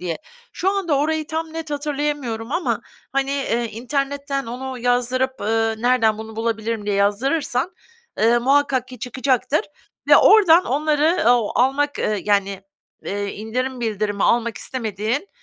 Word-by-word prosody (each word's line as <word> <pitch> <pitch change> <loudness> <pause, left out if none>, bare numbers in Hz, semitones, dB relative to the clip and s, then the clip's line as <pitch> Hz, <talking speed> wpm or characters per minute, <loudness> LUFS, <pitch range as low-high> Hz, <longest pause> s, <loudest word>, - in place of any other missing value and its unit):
diye. 175 -2 -3 0.3
Şu 380 - 0
anda 355 -8 0
orayı 310 +1 0
tam 320 0 -4
net 325 -1 -6
hatırlayamıyorum 285 -5 -3
ama, 345 +2 0 0.3
hani, 275 0 0 0.4
internetten 275 +3 -2
onu 255 +2 -5
yazdırıp, 250 +2 0
ııı, 225 +1 0
"Nereden 235 -3 +3
bunu 220 0 -8
bulabilirim?" 225 -1 -2
diye 205 - 0
yazdırırsan, 250 - 0 0.5
eee, 230 +2 +4
muhakkak 265 0 +2
ki 255 -2 -10
çıkacaktır 255 +3 0 0.5
ve - - +9
oradan 370 -5 +6
onları, 305 +4 +1
ooo, 240 -4 +2
almak, 280 +3 +1
ııı, 210 -1 0
yani, 200 -2 0 0.4
eee, 205 +1 -3
indirim 250 +4 -3
bildirimi 210 -3 -1
almak 235 -2 +1
istemediğin, 225 - -3
255 Hz, 130 wpm, -21 LUFS, 220-290 Hz, 0.5 s, ve